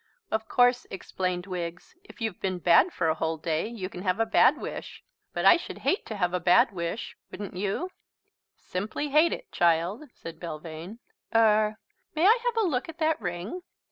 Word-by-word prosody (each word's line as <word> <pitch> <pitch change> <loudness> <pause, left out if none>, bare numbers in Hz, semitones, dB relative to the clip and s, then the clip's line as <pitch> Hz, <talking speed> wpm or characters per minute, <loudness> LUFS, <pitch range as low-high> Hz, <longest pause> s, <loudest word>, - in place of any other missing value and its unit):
"Of 220 0 -1
course," 245 0 +3
explained 185 -1 -3
Wiggs, 170 -3 -6
"if 400 - -16
you've 220 -5 -3
been 185 -1 -1
bad 175 - +5
for 170 - -1
a 160 - +3
whole 160 0 -2
day 160 +3 -1
you 220 -5 -5
can 180 -1 -9
have 185 +1 0
a 225 - +3
bad 240 +6 +5
wish. - - -7 0.3
But - - -2
I - - +8
should 345 - -8
hate 390 - +1
to 220 - -5
have 180 -3 0
a 180 - +1
bad 190 +9 +5
wish, 170 +3 -4
wouldn't 200 -2 -7
you?" 205 - -2 0.6
"Simply 210 +10 -4
hate 310 +4 +4
it, - - -6
child," 175 - +1
said 165 -1 -9
Belvane. 165 +4 -7 0.4
"Er 215 -1 +4 0.4
may 320 +3 +2
I 450 +5 +6
have 480 -1 0
a - - +2
look 270 -2 -1
at 325 - -9
that 315 -4 +1
ring?" 180 - -4
200 Hz, 190 wpm, -27 LUFS, 175-245 Hz, 0.6 s, I